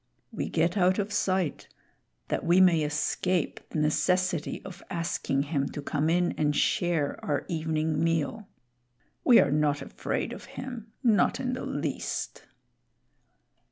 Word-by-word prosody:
We -, -, -3 dB
get 170 Hz, +4 st, +1 dB
out 185 Hz, 0 st, +3 dB
of 210 Hz, 0 st, -2 dB
sight 185 Hz, -4 st, 0 dB, 0.6 s
that -, -, -1 dB
we 175 Hz, +2 st, +4 dB
may 175 Hz, -4 st, +5 dB
escape 150 Hz, +3 st, 0 dB
the -, -, -4 dB
necessity 170 Hz, +2 st, +1 dB
of 190 Hz, -1 st, -9 dB
asking 165 Hz, -6 st, -1 dB
him 140 Hz, -2 st, -1 dB
to 145 Hz, -, -4 dB
come 150 Hz, +2 st, 0 dB
in 175 Hz, +1 st, +2 dB
and 150 Hz, -1 st, +2 dB
share 165 Hz, -5 st, +1 dB
our 145 Hz, -1 st, -1 dB
evening 160 Hz, -1 st, -1 dB
meal. 165 Hz, +6 st, -1 dB, 0.8 s
We 240 Hz, -, +7 dB
are 140 Hz, -, +3 dB
not 145 Hz, -1 st, +2 dB
afraid -, -, -3 dB
of -, -, -9 dB
him, 240 Hz, -4 st, -7 dB
not 215 Hz, -6 st, +3 dB
in 255 Hz, -1 st, -1 dB
the 255 Hz, -, -4 dB
least." -, -, -3 dB
170 Hz, 140 wpm, -28 LUFS, 150-185 Hz, 0.8 s, We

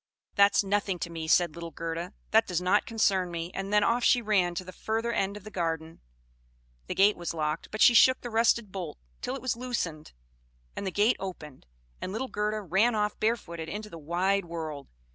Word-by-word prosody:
"That's 200 Hz, 0 st, +5 dB
nothing 195 Hz, -1 st, 0 dB
to 170 Hz, -, -5 dB
me," 165 Hz, -1 st, -5 dB
said 170 Hz, 0 st, +4 dB
little 170 Hz, 0 st, -7 dB
Gerda. 165 Hz, +3 st, -5 dB, 0.2 s
"That 220 Hz, +1 st, +5 dB
does 180 Hz, -2 st, 0 dB
not 180 Hz, +3 st, +2 dB
concern 195 Hz, -5 st, +1 dB
me." 170 Hz, 0 st, -5 dB
And 195 Hz, +1 st, -4 dB
then 210 Hz, 0 st, +4 dB
off 240 Hz, +1 st, +2 dB
she 245 Hz, -, +5 dB
ran 195 Hz, -6 st, +1 dB
to 185 Hz, -, -3 dB
the 185 Hz, -, -9 dB
further 225 Hz, +4 st, -2 dB
end 200 Hz, -2 st, -1 dB
of 210 Hz, -, -12 dB
the 215 Hz, -, -10 dB
garden. 165 Hz, -3 st, -3 dB, 0.9 s
The -, -, -3 dB
gate 205 Hz, +2 st, +5 dB
was 170 Hz, -1 st, -5 dB
locked, 155 Hz, 0 st, -2 dB
but 215 Hz, -, -5 dB
she 240 Hz, -, +8 dB
shook 260 Hz, +2 st, +6 dB
the 240 Hz, -, -6 dB
rusted 225 Hz, -2 st, +2 dB
bolt 180 Hz, -6 st, -6 dB, 0.2 s
till 255 Hz, -, -3 dB
it 270 Hz, -, -8 dB
was 255 Hz, -3 st, 0 dB
loosened, 230 Hz, -11 st, -4 dB, 0.6 s
and 200 Hz, -, -4 dB
the -, -, -1 dB
gate 210 Hz, +6 st, +3 dB
opened; 150 Hz, -, -8 dB, 0.3 s
and 185 Hz, -, -4 dB
little 255 Hz, +6 st, -3 dB
Gerda 210 Hz, +1 st, -1 dB
ran 205 Hz, +6 st, +2 dB
off 210 Hz, 0 st, -1 dB
barefooted 170 Hz, -8 st, -2 dB
into 210 Hz, +3 st, -6 dB
the 165 Hz, -, -8 dB
wide 180 Hz, +5 st, 0 dB
world. 160 Hz, -4 st, -6 dB
195 Hz, 205 wpm, -28 LUFS, 170-215 Hz, 0.9 s, she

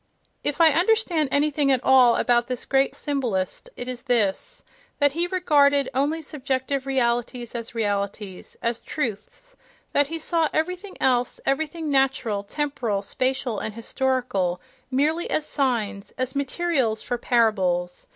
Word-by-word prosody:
If 290 Hz, +2 st, -2 dB
I 325 Hz, -2 st, +7 dB
understand 350 Hz, -3 st, +2 dB
anything 290 Hz, -1 st, +2 dB
at 260 Hz, -1 st, +1 dB
all 255 Hz, -3 st, +6 dB
about 240 Hz, -1 st, +2 dB
this 250 Hz, -1 st, -3 dB
great 270 Hz, 0 st, +2 dB
symbolist, 255 Hz, -, -2 dB
it 245 Hz, -, -6 dB
is 250 Hz, -1 st, -5 dB
this: 245 Hz, -, -1 dB, 0.3 s
that 285 Hz, -1 st, +3 dB
he 340 Hz, +4 st, -1 dB
regarded 285 Hz, -7 st, +3 dB
only 295 Hz, +5 st, 0 dB
subjective 270 Hz, -1 st, -2 dB
realities 240 Hz, -2 st, -1 dB
as 235 Hz, -1 st, -6 dB
realities, 200 Hz, -3 st, -3 dB
as 235 Hz, -1 st, 0 dB
"truths" 300 Hz, -, -5 dB, 0.4 s
—that 285 Hz, -1 st, +3 dB
he 330 Hz, +3 st, -4 dB
saw 325 Hz, 0 st, +1 dB
everything 365 Hz, +5 st, -2 dB
else, 250 Hz, -2 st, +1 dB
everything 310 Hz, +2 st, -1 dB
natural, 265 Hz, -6 st, +1 dB
temporal, 235 Hz, -5 st, -2 dB
spatial 255 Hz, 0 st, -1 dB
and 215 Hz, -, -5 dB
historical, 230 Hz, -7 st, -1 dB, 0.3 s
merely 300 Hz, +6 st, 0 dB
as 305 Hz, -, 0 dB
signs, 230 Hz, -9 st, -1 dB
as 255 Hz, 0 st, -2 dB
materials 275 Hz, -5 st, 0 dB
for 245 Hz, -, -3 dB
parables. 185 Hz, -8 st, +1 dB
265 Hz, 135 wpm, -24 LUFS, 230-295 Hz, 0.4 s, I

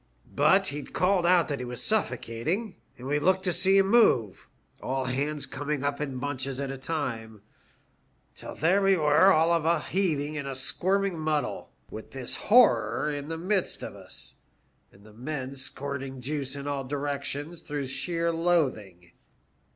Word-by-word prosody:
But 190 Hz, +7 st, +4 dB
he'd 145 Hz, -1 st, -7 dB
called 180 Hz, 0 st, +2 dB
out 175 Hz, -2 st, +4 dB
that 140 Hz, -2 st, -2 dB
he 125 Hz, -, -4 dB
was 125 Hz, 0 st, -6 dB
suffocating, 180 Hz, -, -1 dB, 0.2 s
and 125 Hz, -, -10 dB
we 145 Hz, +2 st, +1 dB
looked 185 Hz, +4 st, +2 dB
to 180 Hz, -, +1 dB
see 190 Hz, +3 st, +4 dB
him 195 Hz, 0 st, +4 dB
move, 120 Hz, -, +3 dB, 0.3 s
a]l 130 Hz, 0 st, -2 dB
hands 140 Hz, +4 st, -1 dB
coming 145 Hz, +1 st, -3 dB
up 145 Hz, +1 st, -1 dB
in 135 Hz, -3 st, -3 dB
bunches 135 Hz, 0 st, -4 dB
at 140 Hz, -1 st, -3 dB
a 135 Hz, -, -6 dB
time, 115 Hz, -8 st, -4 dB, 0.9 s
till -, -, -9 dB
there 180 Hz, +6 st, +3 dB
we 195 Hz, -1 st, +4 dB
were 155 Hz, +5 st, +5 dB
all 160 Hz, 0 st, +4 dB
of 165 Hz, -2 st, +2 dB
a 165 Hz, 0 st, +2 dB
heaving 155 Hz, -4 st, -1 dB
and 140 Hz, -, -5 dB
squirming 190 Hz, +6 st, 0 dB
muddle, 155 Hz, -2 st, -2 dB, 0.2 s
with 110 Hz, -, -8 dB
this 130 Hz, -2 st, -3 dB
horror 220 Hz, -9 st, +4 dB
in 145 Hz, 0 st, -5 dB
the 165 Hz, 0 st, -4 dB
midst 185 Hz, +2 st, -1 dB
of -, -, -6 dB
us, -, -, -9 dB, 0.5 s
and 100 Hz, -, -20 dB
the 105 Hz, 0 st, -16 dB
men 130 Hz, +2 st, -5 dB
squirting 135 Hz, 0 st, -5 dB
juice 135 Hz, +1 st, -4 dB
in 140 Hz, 0 st, -6 dB
all 140 Hz, -1 st, -2 dB
directions 145 Hz, +3 st, -4 dB
through 145 Hz, -3 st, -4 dB
sheer 170 Hz, +5 st, -1 dB
loathing. 130 Hz, -, 0 dB
145 Hz, 165 wpm, -27 LUFS, 135-170 Hz, 0.9 s, were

